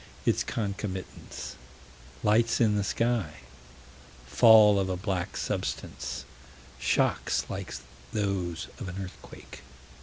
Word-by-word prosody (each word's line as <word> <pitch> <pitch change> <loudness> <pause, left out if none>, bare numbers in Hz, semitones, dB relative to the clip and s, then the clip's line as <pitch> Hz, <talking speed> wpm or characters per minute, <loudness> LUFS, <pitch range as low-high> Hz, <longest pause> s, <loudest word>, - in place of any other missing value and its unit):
Its - - +2
concomitants: 100 -3 -5 0.7
Lights 115 +2 +3
in 110 -3 +4
the 105 - +1
sky; 100 -9 -1 0.8
Fall 105 - +7
of 95 -1 0
a 90 - -1
black 90 -2 -2
substance; - - -3 0.5
Shocks - - +1
like - - -5 0.4
those 95 -5 -2
of 105 -7 -5
an 90 - -7
earthquake. 95 -2 -10
100 Hz, 100 wpm, -28 LUFS, 90-110 Hz, 0.8 s, Fall